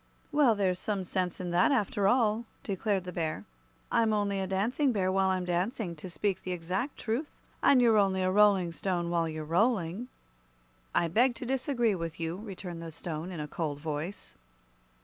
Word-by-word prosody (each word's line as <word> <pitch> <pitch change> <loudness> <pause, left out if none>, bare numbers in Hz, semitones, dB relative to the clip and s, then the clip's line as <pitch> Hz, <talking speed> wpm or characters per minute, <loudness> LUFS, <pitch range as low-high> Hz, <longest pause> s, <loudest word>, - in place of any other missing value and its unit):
"Well, 285 -6 +4
there's 185 -3 +1
some 200 -3 -2
sense 180 -1 -2
in 180 -1 -3
that, 180 +11 +4
after 205 -5 +1
all," 225 0 +2 0.2
declared 200 -1 -1
the 180 - -6
Bear. 160 -3 -3 0.5
"I'm 225 -1 +3
only 200 -2 0
a 190 - -2
Dancing 230 +9 +1
Bear 190 -4 +1
while 190 0 +2
I'm 185 -1 0
dancing, 180 +1 -1
to 185 +4 -8
speak 195 +2 -1
the 185 - -3
exact 185 - -3
truth; 245 +7 -2 0.3
and 270 - +6
you're 230 -3 +5
only 190 -2 +2
a 185 - +2
Rolling 195 -3 +4
Stone 175 -1 -1
while 165 -1 +1
you're 155 -1 -5
rolling." 195 +3 +1 0.9
"I 170 - +3
beg 240 +9 +3
to 250 - -6
disagree 255 -3 +1
with 165 -3 -5
you," 165 +1 -2
returned 190 -5 -7
the 165 - -6
Stone, 160 +1 -5
in 175 - -6
a 150 - -4
cold 150 -2 -3
voice. 155 +5 -4
190 Hz, 185 wpm, -30 LUFS, 170-220 Hz, 0.9 s, and